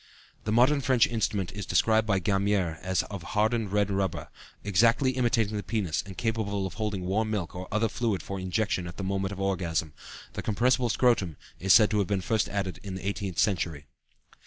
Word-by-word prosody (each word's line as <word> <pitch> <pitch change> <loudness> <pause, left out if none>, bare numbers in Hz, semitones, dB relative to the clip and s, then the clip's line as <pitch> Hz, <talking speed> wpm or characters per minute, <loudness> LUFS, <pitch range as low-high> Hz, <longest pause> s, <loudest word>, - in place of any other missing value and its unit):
" - - -30
The 105 - -1
modern 130 +6 +4
French 130 -3 +4
instrument 105 -5 -1
is 100 -1 -6
described 110 -1 +3
by 100 -3 +2
Gamier 95 -3 0
as 95 0 0
of 100 -3 -7
hardened 110 +2 0
red 100 -1 +1
rubber, 95 -2 -2 0.3
exactly 115 +7 +3
imitating 115 -4 +1
the - - -2
penis 100 -6 -1
and 95 -3 -11
capable 110 -4 -1
of 90 - -5
holding 100 -2 -3
warm 110 +4 0
milk 100 -6 -2
or 90 +1 -6
other 110 +2 +2
fluid 110 -6 -1
for 100 0 -5
injection 95 -1 -1
at 85 - -9
the 100 - -4
moment 95 0 -1
of 100 - -7
orgasm; 85 -6 -1 0.4
the - - -4
compressible 120 +3 +1
scrotum 105 - +2 0.2
is 95 +1 +1
said 110 +1 +7
to 105 - +2
have 100 - +1
been 100 -2 0
first 110 +3 0
added 95 -2 -3
in 95 -2 -6
the 95 +1 -5
eighteenth 100 -3 -3
century. 85 -7 0
100 Hz, 200 wpm, -28 LUFS, 95-110 Hz, 0.4 s, said